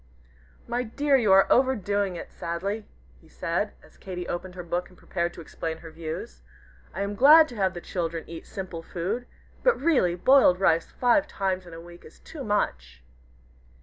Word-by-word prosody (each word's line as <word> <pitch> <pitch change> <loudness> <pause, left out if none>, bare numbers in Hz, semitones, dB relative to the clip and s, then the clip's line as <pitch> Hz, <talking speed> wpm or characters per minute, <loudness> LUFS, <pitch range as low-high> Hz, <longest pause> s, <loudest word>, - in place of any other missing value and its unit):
"My 240 +1 -1
dear, 280 +4 +1
you 225 -7 +3
are 195 0 +7
overdoing 205 -7 +2
it - - -8
sadly," 190 +5 -4 0.3
he - - -21
said, 175 +5 -2
as - - -20
Katy 180 -2 -6
opened 180 +1 -5
her 180 - -6
book 175 +1 -3
and 180 - -20
prepared 170 -1 -2
to - - -9
explain 160 0 -5
her 165 0 -11
views; 160 - -7 0.5
"I 190 - -5
am 200 +1 -3
glad 305 +8 +8
to 245 - -10
have 190 -2 +1
the 175 - -6
children 165 -3 -3
eat 165 -1 -9
simple 185 -4 -6
food 190 +9 -4 0.3
but - - +3
really, 265 - +2
boiled 185 -2 +5
rice 165 -4 +2
five 270 +5 +2
times 190 - -2
in 170 - -11
a - - -8
week 175 +1 -13
is - - -15
too 300 -4 -9
much." 65 - -2
185 Hz, 180 wpm, -26 LUFS, 170-230 Hz, 0.5 s, glad